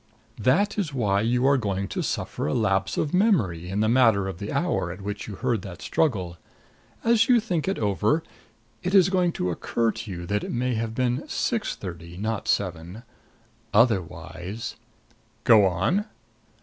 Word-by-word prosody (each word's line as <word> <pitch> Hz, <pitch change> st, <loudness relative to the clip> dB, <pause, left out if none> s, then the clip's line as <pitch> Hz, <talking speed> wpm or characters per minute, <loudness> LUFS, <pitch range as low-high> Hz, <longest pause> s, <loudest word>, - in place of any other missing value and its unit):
"That 190 Hz, -, +2 dB
is 155 Hz, -8 st, -2 dB
why 100 Hz, -5 st, +1 dB
you 120 Hz, +3 st, +1 dB
are 140 Hz, 0 st, +4 dB
going 100 Hz, -3 st, -2 dB
to -, -, -2 dB
suffer -, -, -3 dB
a 75 Hz, -, 0 dB
lapse 95 Hz, -3 st, +1 dB
of 150 Hz, -, -1 dB
memory 110 Hz, -, +2 dB
in 100 Hz, +2 st, -1 dB
the 110 Hz, -, +2 dB
matter 115 Hz, -5 st, +4 dB
of 95 Hz, -3 st, -6 dB
the 100 Hz, -, -5 dB
hour 170 Hz, -, 0 dB
at 90 Hz, +3 st, -9 dB
which 105 Hz, +1 st, -5 dB
you 105 Hz, -, -6 dB
heard 120 Hz, -1 st, -1 dB
that 90 Hz, -2 st, -9 dB
struggle. 95 Hz, -, -1 dB, 0.7 s
As 230 Hz, 0 st, +3 dB
you 245 Hz, -1 st, +6 dB
think 180 Hz, -8 st, -2 dB
it 195 Hz, -, 0 dB
over, 105 Hz, -, +1 dB, 0.6 s
it 180 Hz, +3 st, -1 dB
is 190 Hz, -1 st, +6 dB
going 180 Hz, -2 st, +2 dB
to 90 Hz, -, -1 dB
occur 115 Hz, +6 st, 0 dB
to 110 Hz, -1 st, -8 dB
you 85 Hz, -2 st, -5 dB
that 105 Hz, +2 st, -1 dB
it -, -, -4 dB
may 125 Hz, +1 st, 0 dB
have 110 Hz, 0 st, -3 dB
been 125 Hz, 0 st, 0 dB
six -, -, -1 dB
thirty, 85 Hz, -1 st, -8 dB
not 110 Hz, +1 st, -3 dB
seven. 90 Hz, +3 st, -2 dB, 0.7 s
Otherwise 105 Hz, -2 st, 0 dB, 0.3 s
" -, -, -36 dB
"Go 110 Hz, -4 st, +6 dB
on." 110 Hz, -, 0 dB
110 Hz, 175 wpm, -25 LUFS, 95-135 Hz, 0.7 s, you